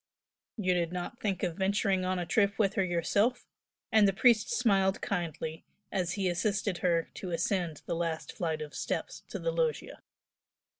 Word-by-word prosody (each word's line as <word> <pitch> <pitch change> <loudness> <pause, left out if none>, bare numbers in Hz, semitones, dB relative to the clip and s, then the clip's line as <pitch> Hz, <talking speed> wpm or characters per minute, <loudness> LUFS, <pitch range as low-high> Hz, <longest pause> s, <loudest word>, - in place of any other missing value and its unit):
"You 185 -4 +2
did 170 -2 0
not 180 +6 -5
think 195 -4 -2
of 175 -3 -1
venturing 195 -1 +1
on 185 0 0
a 175 - -2
trip 200 +2 +2
with 200 -3 +2
her 195 - +2
yourself?" 185 +7 +1 0.5
and 215 -2 +6
the 195 - +2
priest 230 +2 +4
smiled 195 - +2
kindly, 160 -4 -3 0.3
as 180 -2 0
he 195 -2 0
assisted 200 +1 0
her 170 -2 +1
to 185 - -6
ascend 170 -2 -1
the - - -2
last 165 -1 -2
flight 160 -3 -2
of 150 - -10
steps - - -3
to - - -4
the - - -1
loggia. 485 -2 -1
185 Hz, 170 wpm, -30 LUFS, 170-205 Hz, 0.5 s, and